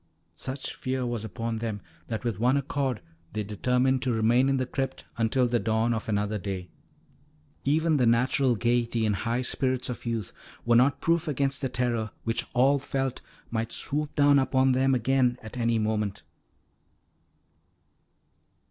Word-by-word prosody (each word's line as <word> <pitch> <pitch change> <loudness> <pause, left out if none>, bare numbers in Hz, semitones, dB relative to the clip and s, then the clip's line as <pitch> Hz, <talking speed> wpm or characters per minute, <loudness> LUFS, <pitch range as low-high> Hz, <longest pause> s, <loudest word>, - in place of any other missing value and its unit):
Such 130 +8 -5
fear 130 -1 -2
was 120 -3 -2
upon 115 +2 -3
them 110 -2 -3 0.3
that 110 0 -4
with 115 -5 -2
one 125 +4 +3
accord 135 -3 -1 0.3
they 105 0 -2
determined 125 +5 +1
to 130 - 0
remain 120 +4 +3
in 135 - +2
the 130 - 0
crypt 135 +1 -4
until 120 +2 +2
the 120 0 +1
dawn 110 +2 +1
of 115 0 -4
another 105 0 0
day. 95 -2 -5 1.0
Even 155 +2 +2
the 125 -3 +3
natural 125 +2 +3
gaiety 120 0 +1
and 105 -2 +1
high 120 +5 -1
spirits 130 0 -1
of 125 -1 -6
youth 115 -4 -3 0.3
were 120 0 +4
not 130 +3 +4
proof 170 0 +1
against 140 -1 0
the 135 - -1
terror 120 -4 -1
which 115 0 -2
all 135 +3 +4
felt 135 -1 -2 0.3
might 115 0 -2
swoop 150 +1 -2
down 145 -1 +5
upon 130 0 +3
them 130 +1 +3
again 125 0 +2
at 110 +2 -9
any 115 -2 +1
moment. 105 -2 -1
120 Hz, 155 wpm, -27 LUFS, 115-135 Hz, 1.0 s, down